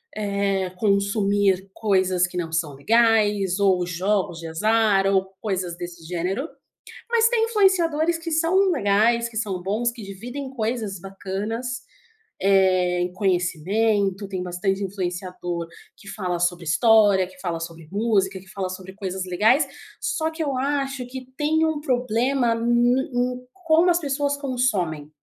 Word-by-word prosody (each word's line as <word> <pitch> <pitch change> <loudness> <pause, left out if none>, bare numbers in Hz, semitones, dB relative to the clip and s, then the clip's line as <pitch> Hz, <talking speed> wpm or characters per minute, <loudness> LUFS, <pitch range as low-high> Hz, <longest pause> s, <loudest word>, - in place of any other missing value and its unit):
eh, 200 -2 -1
consumir 200 -2 +1
coisas 185 -4 +2
que 180 - -8
não 165 -2 -3
são 160 -3 -1
legais 210 +1 +2
ou 190 -3 +3
jogos 180 0 -1
de 165 - -7
azar, 210 +3 +2
ou 190 -1 +1
coisas 185 -5 -2
desse 175 -1 -8
gênero. 180 - -2 0.6
Mas 465 -1 +4
tem 465 -2 +2
influenciadores 345 -7 +2
que 330 0 -6
são 345 +5 +3
legais, 230 - +2
que 230 - -14
são 195 -5 -2
bons, 215 +6 0
que 235 -1 -11
dividem 245 +8 -7
coisas 220 -5 -3
bacanas, 205 +7 -5 0.6
eh, 185 -2 +3
em 180 0 -2
conhecimento, 195 +2 0
tem 190 -2 -4
bastante 190 +2 -2
influenciador 180 -2 -4 0.3
que 195 - -14
fala 180 -4 -3
sobre 175 0 0
história, 205 +2 +4
que 185 0 -17
fala 170 -3 -3
sobre 165 -1 -8
música, 200 -3 +1
que 190 - -18
fala 190 -1 -4
sobre 185 +1 -8
coisas 190 -2 -4
legais. 220 - +3 0.3
Só 320 0 -1
que 320 0 -5
eu 280 -4 -1
acho 270 -2 -1
que 255 0 -8
tem 315 +2 +2
um 315 -1 -1
problema 250 -2 +1
no 230 0 -3
no 245 +1 +2
em 250 - -25 0.2
como 330 +2 +5
as 345 0 +2
pessoas 285 -1 -1
consomem. 210 - -1
200 Hz, 145 wpm, -23 LUFS, 185-250 Hz, 0.6 s, como